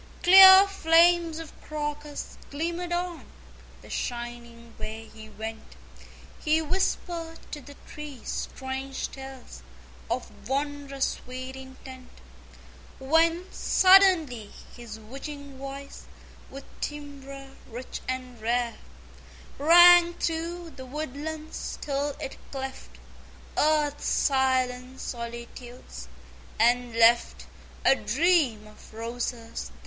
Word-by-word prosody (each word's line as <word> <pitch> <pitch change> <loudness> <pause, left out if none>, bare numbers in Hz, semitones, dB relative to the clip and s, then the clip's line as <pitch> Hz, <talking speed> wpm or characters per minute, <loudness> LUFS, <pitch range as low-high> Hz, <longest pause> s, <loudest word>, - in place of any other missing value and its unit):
Clear 380 +1 +10
flames 340 -2 +4
of 325 -1 -8
Crocus 295 -1 -5
glimmered 340 +4 -3
on 350 -1 -2 0.6
The - - -14
shining 235 -1 -6
way 220 +1 -7
he 220 0 -11
went. 220 +1 -8 0.7
He 315 0 +3
whispered 330 0 -2
to 295 - -6
the 285 +2 -13
trees 295 -5 -6
strange 265 0 -5
tales 265 - -10 0.5
Of - - -5
wondrous 280 0 -1 0.2
sweet 255 +1 -7
intent, 260 -1 -11 0.9
When, 330 +5 +2
suddenly, 360 - +4 0.2
his 235 -3 -9
witching 275 +4 -9
voice 275 +1 -8 0.4
With 275 +1 -9 0.2
timbre 275 -2 -7 0.2
rich 245 +2 -7
and 255 -2 -5
rare, 235 +1 0 0.8
Rang 345 +2 +8
through 335 +1 -3
the 260 - -8
woodlands 305 +3 -5
till 285 0 -2
it 275 -3 -6
cleft 265 -1 -7 0.6
Earth's 300 -1 +1
silent 260 -1 +1
solitudes, 235 - -8 0.5
and 240 +1 +2
left 230 +1 +4 0.4
A 270 - +6
Dream 260 - +2
of 215 0 -16
Roses 230 0 -5
the - - -20
275 Hz, 100 wpm, -27 LUFS, 245-315 Hz, 0.9 s, Clear